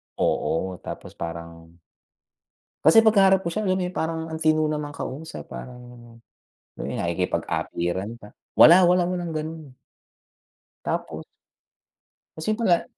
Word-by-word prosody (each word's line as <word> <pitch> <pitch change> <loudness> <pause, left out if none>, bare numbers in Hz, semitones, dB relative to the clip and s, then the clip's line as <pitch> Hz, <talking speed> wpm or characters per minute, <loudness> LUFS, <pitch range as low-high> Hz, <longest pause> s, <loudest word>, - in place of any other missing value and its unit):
Oo, 90 +2 -1
tapos - - -8
parang 85 0 -8 1.1
kasi 165 +8 +8
pagkaharap 195 -3 +5
ko 170 - -3
siya 215 +4 -2
alam 185 0 +1
parang 160 -2 -2
ang 160 - -4
tino 155 -1 +2
namang 150 -1 -3
kausap, 155 +5 -7
parang 120 -2 -11 0.6
nakikipag-apiran 85 +3 -2
pa, 105 -2 -14 0.2
wala 175 +3 +9
wala 180 0 +4
walang 175 -2 -3
ganun. 155 -4 -6 1.1
Tapos - - -3 1.1
Tas 160 - -7
yun 215 - +1
pala, 180 -7 +3
155 Hz, 110 wpm, -24 LUFS, -, 1.1 s, wala